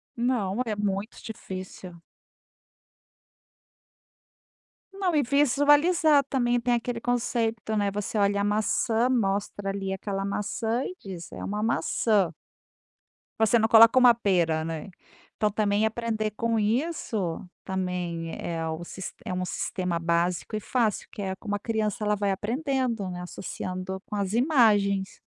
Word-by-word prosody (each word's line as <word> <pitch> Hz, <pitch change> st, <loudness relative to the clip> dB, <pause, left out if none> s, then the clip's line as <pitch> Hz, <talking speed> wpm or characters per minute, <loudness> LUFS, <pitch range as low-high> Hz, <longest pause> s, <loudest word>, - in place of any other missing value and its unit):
Não, 235 Hz, -3 st, 0 dB
é 220 Hz, -2 st, -2 dB
muito 205 Hz, +1 st, -3 dB
difícil. 185 Hz, -4 st, -8 dB, 2.9 s
Não, 380 Hz, -4 st, 0 dB
e 295 Hz, -, +4 dB
visualizar 290 Hz, +3 st, +4 dB
também. 245 Hz, -3 st, +1 dB
Tem 245 Hz, +1 st, +1 dB
aquele 240 Hz, 0 st, -1 dB
conceito, 230 Hz, -2 st, -1 dB
né, 205 Hz, -1 st, +1 dB
você 205 Hz, +2 st, -3 dB
olha 200 Hz, 0 st, +2 dB
a -, -, +1 dB
maçã, 220 Hz, +3 st, +1 dB
mostra 200 Hz, -4 st, 0 dB
ali 195 Hz, -1 st, -3 dB
aquela 195 Hz, 0 st, -3 dB
maçã 220 Hz, +4 st, -1 dB
e 365 Hz, -, -5 dB
diz: 180 Hz, -4 st, -8 dB
"É -, -, -7 dB
uma 210 Hz, +1 st, -2 dB
maçã.". 210 Hz, -5 st, +1 dB, 1.1 s
Você 225 Hz, +2 st, +4 dB
não 220 Hz, -, +3 dB
coloca 230 Hz, +2 st, +8 dB
uma 250 Hz, -2 st, +8 dB
pera, 175 Hz, -8 st, +1 dB
né? 165 Hz, +2 st, -5 dB, 0.5 s
Então, 210 Hz, -, +1 dB
também 210 Hz, 0 st, +1 dB
aprender 220 Hz, -1 st, -2 dB
com 230 Hz, +1 st, 0 dB
isso, 220 Hz, -, -1 dB, 0.2 s
também, 180 Hz, -3 st, -3 dB
é 165 Hz, -1 st, -3 dB
o 160 Hz, +2 st, -4 dB, 0.4 s
é -, -, -3 dB
um 180 Hz, 0 st, -1 dB
sistema 180 Hz, -1 st, -2 dB
básico 170 Hz, +4 st, 0 dB
e -, -, -1 dB
fácil 220 Hz, -1 st, 0 dB
que -, -, -7 dB
é 190 Hz, -1 st, -2 dB
como 205 Hz, +1 st, -4 dB
a -, -, -3 dB
criança, 215 Hz, -1 st, -2 dB
ela 210 Hz, 0 st, +2 dB
vai 200 Hz, 0 st, -1 dB
aprendendo, 240 Hz, 0 st, -1 dB
né, 180 Hz, 0 st, -6 dB
associando 185 Hz, +1 st, -5 dB
com 210 Hz, -, -6 dB
as 200 Hz, -1 st, -1 dB
imagens. 215 Hz, -7 st, +3 dB
210 Hz, 135 wpm, -27 LUFS, 190-235 Hz, 2.9 s, coloca